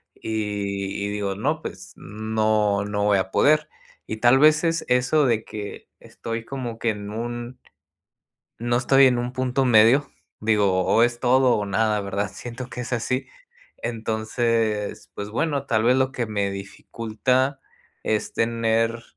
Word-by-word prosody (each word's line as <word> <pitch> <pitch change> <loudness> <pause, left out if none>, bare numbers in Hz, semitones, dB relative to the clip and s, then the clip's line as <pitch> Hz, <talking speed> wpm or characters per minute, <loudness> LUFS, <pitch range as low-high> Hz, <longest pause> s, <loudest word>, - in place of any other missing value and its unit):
y 100 -2 -3
y - - -2
digo, 100 -1 -2
no. 150 +9 -1
Pues 95 -7 -8
no, 110 -1 0
no 105 0 -2
voy 105 -1 +4
a 95 0 -3
poder. 155 +1 +3 0.4
Y 110 - -4
tal 120 +4 +5
vez 155 +2 +5
es 165 -1 0
eso, 125 +4 +3
de 115 -3 +1
que 105 -2 -8
estoy 115 0 -6
como 120 -4 -5
que 115 - 0
en 105 -1 -7
un 120 +2 -5 1.0
no 120 +1 +1
estoy 135 +2 +5
en 125 -1 +2
un 120 +1 -3
punto 130 +1 0
medio. 120 +4 +5 0.3
Digo, 100 -4 +2
o 115 - +4
es 120 0 0
todo 130 0 +4
o 105 - -2
nada, 105 +1 +1
¿verdad? 100 +1 -2
Siento 120 +4 -7
que 125 - -6
es 125 +1 -4
así. 125 +3 -1 0.5
Entonces, 110 -1 -2
pues 100 0 -5
bueno, 140 +4 -1
tal 110 -3 +1
vez 125 +2 +4
lo 130 0 +1
que 125 -3 -2
me 100 -2 -1
dificulta 115 +7 -2 0.4
es 110 -1 -1
tener 115 0 0
115 Hz, 155 wpm, -23 LUFS, 105-125 Hz, 1.0 s, tal